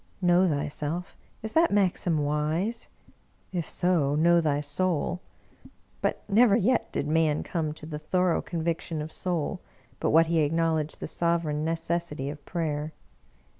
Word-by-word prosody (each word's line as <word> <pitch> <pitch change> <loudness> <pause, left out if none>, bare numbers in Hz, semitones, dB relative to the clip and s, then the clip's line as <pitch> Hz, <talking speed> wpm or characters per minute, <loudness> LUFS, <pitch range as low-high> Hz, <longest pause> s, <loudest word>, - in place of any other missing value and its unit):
Know 180 0 +4
thyself! 150 +4 -3 0.3
Is 220 - -5
that 330 +1 +4
maxim 180 -6 +1
wise? 155 +10 -1 0.7
If 175 -3 -2
so, 165 -6 +1
know 170 +2 +4
thy 145 -3 +1
soul. 165 +4 -1 0.8
But - - -1
never 215 0 +5
yet 235 +4 +1
did 145 - -2
man 155 -1 +2
come 160 -3 -2
to 155 - -11
the 150 -1 -5
thorough 180 +3 +1
conviction 165 -1 -3
of 155 - -8
soul 180 +1 -2 0.4
but - - 0
what 165 +2 +6
he 165 0 +1
acknowledged 160 0 0
the - - -3
sovereign 165 -2 0
necessity 165 -3 -2
of 145 -1 -11
prayer. 155 -3 -2
165 Hz, 140 wpm, -27 LUFS, 150-180 Hz, 0.8 s, what